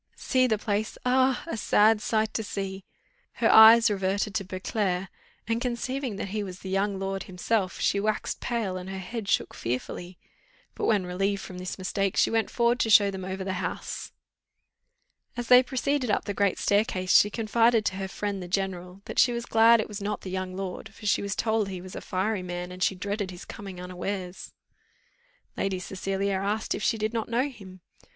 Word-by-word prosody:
"See 255 -1 +2
the 220 -3 +1
place! 210 +1 -2
ah! 260 +1 +3
a 335 - -4
sad 215 0 +4
sight 220 -1 0
to 220 - -1
see." 195 -2 -5 0.5
Her - - +2
eyes 225 +1 +9
reverted 195 +1 -1
to 220 -2 -1
Beauclerc, 185 0 -2 0.4
and, 230 +1 0
conceiving 250 0 -2
that 195 - -4
he 210 +2 -2
was 185 -2 -8
the 190 - -6
young 195 +1 0
lord 195 0 -3
himself, 185 +1 -1
she 200 - +2
waxed 215 +1 -1
pale, 225 -6 -2
and 185 +1 -7
her 190 - -5
head 200 +2 -5
shook - - +1
fearfully; 175 +9 -4 0.6
but, - - -3
when 205 -4 +2
relieved 195 +2 -1
from 180 -1 -8
this 185 0 -5
mistake, 195 +1 -1
she - - +4
went 225 -2 +1
forward 240 +1 +2
to 225 - +1
show 205 -2 +6
them 190 -1 -6
over 190 +1 -4
the 190 -1 -3
house. - - -5 1.3
As 240 -1 -4
they 250 0 +9
proceeded 260 0 -1
up 205 - +1
the 205 - -2
great 200 -1 +1
staircase, 200 -3 +1
she 205 - +7
confided 225 +1 +2
to 190 - -1
her 195 -1 -3
friend, 200 0 -4
the 180 - -6
general, 185 0 -3
that - - -3
she 245 - +6
was 235 0 -3
glad 230 +1 +6
it 215 - -1
was 205 -1 -7
not 205 0 -3
the 185 - -7
young 185 0 -3
lord, 195 +3 -6
for 215 - -12
she 205 - +2
was 200 0 -3
told 220 -2 0
he 185 -2 -5
was 185 +1 -10
a - - -5
fiery 190 +2 -1
man, 180 0 -5
and 185 0 -10
she 190 - +2
dreaded 200 +1 -3
his 180 -1 -9
coming 195 -3 -8
unawares. 180 +1 -5 1.0
Lady 195 -1 -1
Cecilia 195 +1 -2
asked 210 +2 -1
if - - -4
she 225 - +1
did 215 +1 -2
not 225 -1 -2
know 245 +4 +1
him? 190 -7 -13
200 Hz, 200 wpm, -27 LUFS, 185-220 Hz, 1.3 s, eyes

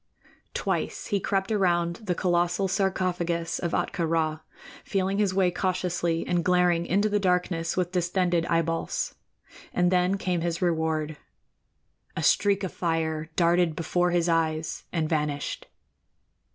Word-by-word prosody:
Twice - - -2
he 205 -2 0
crept 195 +2 -1
around 175 -4 +1
the 190 -5 -3
colossal 175 +1 +1
sarcophagus 180 -3 -1
of 170 -1 -2
Ahtka 170 -3 0
Rā, 160 -1 0 0.4
feeling 195 +1 -1
his 205 -3 +2
way 185 -1 +2
cautiously 175 -2 -1
and 175 -1 0
glaring 180 -1 +2
into 200 +3 +2
the 205 -1 +1
darkness 180 -3 0
with 180 -1 0
distended 175 -1 +1
eyeballs; 165 - -1 0.6
and 180 0 +2
then 180 +1 +2
came 180 -3 -1
his 170 -1 -1
reward. 160 -3 0 1.0
A - - -1
streak 200 -1 +3
of 190 - -3
fire 160 -2 -1
darted 170 -1 +3
before 175 +2 +1
his 175 -1 +1
eyes 160 -1 0
and 160 -3 0
vanished. 150 -2 -2
175 Hz, 135 wpm, -26 LUFS, 165-185 Hz, 1.0 s, streak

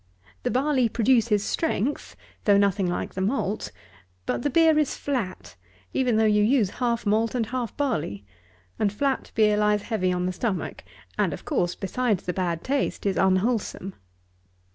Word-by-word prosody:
The - - -1
barley 260 -2 +2
produces 225 -3 +2
strength, 290 -4 -1 0.3
though 205 -2 +5
nothing 200 -1 +2
like 175 - -3
the 190 - -3
malt; 210 - -1 0.5
but - - -1
the 290 - 0
beer 320 +2 +4
is 300 - 0
flat, 185 - -4 0.4
even 250 -3 +1
though 220 - +4
you 210 -1 +4
use 215 -3 +3
half 235 -2 0
malt 220 +3 +1
and 235 -2 +1
half 245 -1 -4
barley; 150 - -2 0.5
and 205 -2 +2
flat 270 +5 -1
beer 210 -2 +4
lies 210 -1 +2
heavy 185 -6 0
on 180 0 -1
the 185 - -1
stomach, 195 -2 -3 0.4
and - - +2
of - - -9
course, 180 - 0
besides 210 0 -1
the 180 - -2
bad 170 -3 -2
taste, 275 -4 -1
is 195 - +1
unwholesome. 190 0 +1
215 Hz, 165 wpm, -25 LUFS, 190-250 Hz, 0.5 s, though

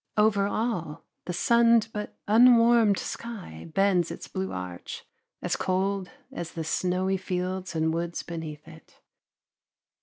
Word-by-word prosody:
Over 210 -2 +3
all, 205 -9 -3 0.2
the - - -3
sunned 230 +3 +4
but 210 -1 -5
unwarmed 230 -2 +6
sky 200 - -7
bends 190 -2 +2
its - - -7
blue 190 0 -4
arch, 90 -1 -7 0.4
as - - 0
cold 190 0 -1 0.2
as 170 -1 -6
the 165 - -4
snowy 185 +3 0
fields 185 -1 -3
and 160 0 +1
woods 170 0 -3
beneath 160 -3 -7
it. 160 0 -16
185 Hz, 125 wpm, -27 LUFS, 165-210 Hz, 0.4 s, unwarmed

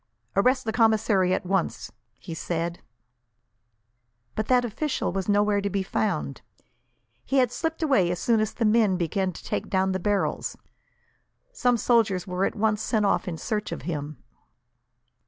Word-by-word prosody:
"Arrest 250 +6 +3
the 220 - -1
commissary, 220 -5 +3
at 185 - 0
once," 190 -1 -1 0.3
he 165 - -8
said. 170 +1 -3 1.5
But 215 - -2
that 250 -1 +3
official 260 +6 -2
was 190 +2 -3
nowhere 205 0 +3
to 200 - -1
be 195 0 -1
found. 180 -8 -2 0.8
He 275 - 0
had 250 -3 +3
slipped 325 +2 -3
away, 235 - +3
as 180 - -1
soon 230 +4 +2
as 215 0 0
the 230 - -1
men 215 -3 +3
began 185 +2 -1
to 165 - -11
take - - -3
down 190 0 +1
the 190 - -1
barrels. 205 +1 -1 0.9
Some 245 - +2
soldiers 220 -6 +2
were 185 +1 -1
at - - -2
once 215 0 +1
sent 220 -2 +1
off 200 - +1
in 170 -3 -3
search 210 +5 -3
of - - -5
him. 150 -2 -4
205 Hz, 160 wpm, -26 LUFS, 185-225 Hz, 1.5 s, Arrest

